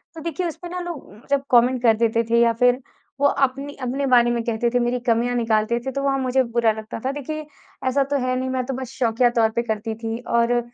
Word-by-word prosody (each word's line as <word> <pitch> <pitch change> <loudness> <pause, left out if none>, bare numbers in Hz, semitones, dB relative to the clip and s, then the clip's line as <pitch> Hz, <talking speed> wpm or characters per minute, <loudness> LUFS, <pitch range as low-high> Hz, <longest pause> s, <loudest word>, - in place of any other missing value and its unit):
तो 320 - -8
देखिए 335 +2 -2
उस 325 - -5
पर 350 - -6
ना 360 +1 -4
लोग 345 -4 -6
उम, 205 - -15
जब 280 -1 +1
कमेंट 245 +1 +4
कर 230 -2 +6
देते 230 0 +2
थे 235 0 +4
या 235 -1 +4
फिर 250 +1 +4 0.4
वो 285 - +2
अपनी 275 +1 0
अपने 265 +3 -2
बारे 240 -2 +4
में 235 -1 -1
कहते 235 +1 0
थे, 245 - +1
मेरी 245 +1 0
कमियाँ 240 +1 +1
निकालते 225 0 +1
थे 265 - -2
तो 275 +1 -3
वहाँ 275 -1 +1
मुझे 260 0 +2
बुरा 235 -2 +1
लगता 220 +1 -7
था। 265 - +1
देखिए 305 +2 -5 0.4
ऐसा 275 +2 +2
तो 280 +1 -1
है 255 - +1
नहीं 260 0 -2
मैं 260 -1 -1
तो 270 - -3
बस 260 -1 -6
शौकिया 240 0 +3
तौर 220 -1 +4
पे 235 - +2
करती 220 -1 -3
थी। 225 +1 -4
और 235 +1 +2
245 Hz, 250 wpm, -22 LUFS, 235-270 Hz, 0.4 s, कर